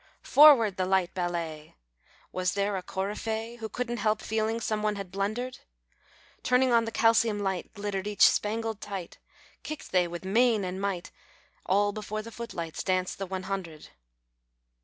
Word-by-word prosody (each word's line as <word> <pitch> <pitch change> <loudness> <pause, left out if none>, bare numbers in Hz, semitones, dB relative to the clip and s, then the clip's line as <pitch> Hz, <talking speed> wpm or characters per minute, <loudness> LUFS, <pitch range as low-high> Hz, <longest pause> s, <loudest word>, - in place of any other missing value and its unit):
" - - -47 0.2
Forward, 265 -10 +8
the 185 -1 0
light 190 -2 +1
ballet! 170 -4 -4 0.3
" - - -31
■Was 185 0 -1
there 200 0 0
a 190 - -2
coryphee 220 +5 -4
Who 220 -2 -6
couldn't 240 +2 -3
help 215 -1 +1
feeling 220 +1 -1
Some 215 -2 -1
one 210 0 0
had 195 -3 -7
blundered? 215 +6 -3 0.8
Turned 250 +1 +3
on 230 -1 +4
the 225 - -4
calcium 225 -1 +3
light. 190 -3 -2
Glittered 205 -1 -3
each 210 -1 +6
spangled 220 0 -1
tight. 195 -4 -6 0.4
Kicked 310 - -7
they 180 -2 +3
with 175 +2 -7
main 225 +1 +3
and 185 +1 -4
might; 195 -3 -3 0.6
All 205 +2 +3
before 215 0 -5
the 230 - -9
foot 230 +1 -7
lights 165 -2 -4
Danced 185 -1 -1
the 195 - -3
one 190 0 -4
hundred. 180 -6 -5
205 Hz, 170 wpm, -28 LUFS, 185-225 Hz, 0.8 s, Forward